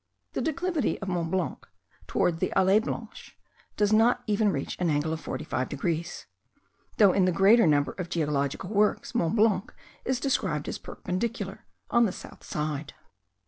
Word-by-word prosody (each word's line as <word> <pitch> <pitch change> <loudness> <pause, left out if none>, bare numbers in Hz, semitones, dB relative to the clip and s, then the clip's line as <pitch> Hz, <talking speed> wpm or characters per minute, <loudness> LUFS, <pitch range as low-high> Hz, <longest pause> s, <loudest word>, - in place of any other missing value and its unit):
The - - -1
declivity 325 -3 -1
of 195 - -5
Mont 170 -2 -1
Blanc 185 -1 -2 0.4
towards 165 - +1
the - - 0
Allee 190 +3 +5
Blanche 225 0 -7 0.4
does 210 0 +2
not 240 +3 +4
even 210 -1 +2
reach 140 -4 -3
an 180 -2 +1
angle 150 +1 0
of 160 - -5
45 130 -4 -3
degrees; 165 +3 -3 0.7
though 200 -5 +6
in 190 - +3
the 185 - +3
greater 195 +4 +5
number 145 -2 +3
of 180 -2 -6
geological 150 +1 -1
works, 210 0 +1
Mont 170 +5 +1
Blanc 210 -3 +2 0.3
is 260 -1 -1
described 185 - -1
as - - -4
perpendicular 195 0 -4 0.2
on 235 -1 +5
the - - -2
south - - -11
side. 150 -1 -4
185 Hz, 160 wpm, -27 LUFS, 160-215 Hz, 0.7 s, though